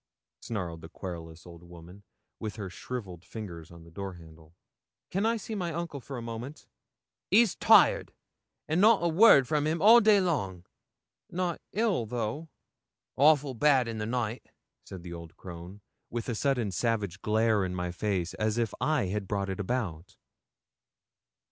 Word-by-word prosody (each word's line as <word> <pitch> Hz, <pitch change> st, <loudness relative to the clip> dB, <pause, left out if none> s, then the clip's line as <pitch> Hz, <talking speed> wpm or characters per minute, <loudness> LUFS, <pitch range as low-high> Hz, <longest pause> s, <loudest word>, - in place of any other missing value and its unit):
snarled 90 Hz, -7 st, -5 dB
the 80 Hz, -, -10 dB
querulous 85 Hz, -3 st, -8 dB
old 85 Hz, -1 st, -12 dB
woman, 85 Hz, +2 st, -13 dB, 0.4 s
with 105 Hz, -2 st, -5 dB
her 100 Hz, -4 st, -6 dB
shrivelled 95 Hz, -5 st, -7 dB
fingers 85 Hz, -8 st, -8 dB
on 85 Hz, -1 st, -13 dB
the 85 Hz, -, -16 dB
door 95 Hz, +2 st, -6 dB
handle. 80 Hz, -1 st, -16 dB, 0.6 s
'Can 195 Hz, +4 st, +1 dB
I 230 Hz, 0 st, +1 dB
see 220 Hz, +1 st, -7 dB
my 180 Hz, -5 st, -2 dB
uncle 165 Hz, -4 st, -5 dB
for 135 Hz, +1 st, -7 dB
a 120 Hz, -, -6 dB
moment?' 115 Hz, +6 st, -7 dB, 0.6 s
'He's 215 Hz, -1 st, +5 dB
tired, -, -, +5 dB, 0.6 s
and 160 Hz, +4 st, +1 dB
not 215 Hz, -3 st, +5 dB
a -, -, +3 dB
word 165 Hz, -, +6 dB
from 150 Hz, 0 st, +1 dB
him 160 Hz, +2 st, 0 dB
all 225 Hz, +6 st, +8 dB
day 210 Hz, -2 st, +5 dB
long.' 100 Hz, -, -2 dB, 0.6 s
'Not 175 Hz, -1 st, -2 dB
ill, 205 Hz, -, 0 dB
though?' 120 Hz, +8 st, -4 dB, 0.7 s
'Awful 145 Hz, -1 st, +4 dB
bad 130 Hz, -1 st, +3 dB
in 115 Hz, -1 st, -4 dB
the 105 Hz, -, -3 dB
night,' 120 Hz, -1 st, -3 dB, 0.4 s
said 95 Hz, -3 st, -9 dB
the 85 Hz, -1 st, -7 dB
old 85 Hz, -1 st, -10 dB
crone, 90 Hz, +3 st, -10 dB, 0.3 s
with 120 Hz, -1 st, -4 dB
a 120 Hz, -, -1 dB
sudden 120 Hz, -3 st, 0 dB
savage 100 Hz, -1 st, -1 dB
glare 110 Hz, -1 st, +2 dB
in 90 Hz, -1 st, -3 dB
my 90 Hz, -1 st, -3 dB
face, 90 Hz, -1 st, -2 dB
as 110 Hz, +1 st, -1 dB
if 115 Hz, -2 st, 0 dB
I 150 Hz, -5 st, +1 dB
had 100 Hz, +1 st, -3 dB
brought 100 Hz, -1 st, -2 dB
it 95 Hz, -, -5 dB
about. 95 Hz, -5 st, -3 dB
110 Hz, 165 wpm, -29 LUFS, 90-150 Hz, 0.7 s, all